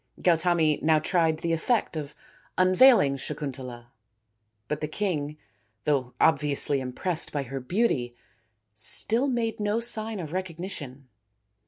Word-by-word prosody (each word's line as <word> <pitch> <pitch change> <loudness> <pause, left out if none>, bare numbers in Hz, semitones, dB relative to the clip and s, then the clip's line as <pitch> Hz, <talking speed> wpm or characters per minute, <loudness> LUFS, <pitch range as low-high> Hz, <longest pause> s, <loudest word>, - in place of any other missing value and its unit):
" - - -19
Gautami 165 -3 +2
now 160 0 +3
tried 160 0 +1
the 165 +1 -2
effect 205 +3 0
of 150 -2 -6 0.4
unveiling 185 - +5
Sakun 145 0 -5
tala, 120 -2 -10 0.8
but 150 +2 -3
the 155 - -2
king, 150 -4 -3 0.5
though 130 -4 -1
obviously 145 -2 +3
impressed 155 +7 -2
by 145 -2 -2
her 135 +1 -6
beauty, 130 - -1 0.6
still 205 - +2
made 235 -4 -2
no 210 +2 0
sign 225 -2 -2
of 160 -2 -6
recognition. 165 -7 -6
155 Hz, 130 wpm, -26 LUFS, 140-185 Hz, 0.8 s, unveiling